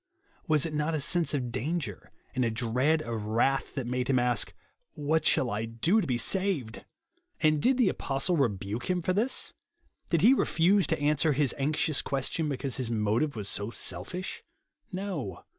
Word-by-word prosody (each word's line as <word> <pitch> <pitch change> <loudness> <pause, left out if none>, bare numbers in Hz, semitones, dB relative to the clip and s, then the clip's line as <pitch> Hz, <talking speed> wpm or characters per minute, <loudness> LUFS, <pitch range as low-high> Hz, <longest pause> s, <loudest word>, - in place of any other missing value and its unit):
"Was 155 -2 +3
it 160 - -4
not 150 +2 0
a - - 0
sense 165 +1 +2
of 125 -4 -2
danger 130 - -4 0.2
and 130 - 0
a 115 - +2
dread 125 +7 +1
of 115 -3 -4
wrath 120 +5 +1
that 135 -4 -2
made 125 0 -2
him 135 - +2
a^k, 125 -1 +1 0.3
" - - -50
What 155 +1 +1
shall 125 - +3
I 105 +2 -2
do 140 - +1
to - - -3
be 125 -3 0
saved 165 - 0 0.3
?" 350 +1 -45
And 155 -1 +3
did 260 - +3
the 240 -7 +4
apostle 135 +5 0
rebuke 110 - -1
him 180 -2 0
for 185 - +1
this? 225 +7 0 0.6
Did 170 -3 +2
he 235 +8 +7
refuse 190 -4 +3
to 160 - 0
answer 150 +1 +2
his 140 -1 +2
anxious 150 +1 +1
question, 140 +3 -2
because 135 -1 -2
his 130 -3 -2
motive 115 +6 0
was 105 -3 -4
so 100 +1 -1
selfish? 115 - -4 0.5
No. 180 - -5
140 Hz, 185 wpm, -29 LUFS, 120-170 Hz, 0.6 s, he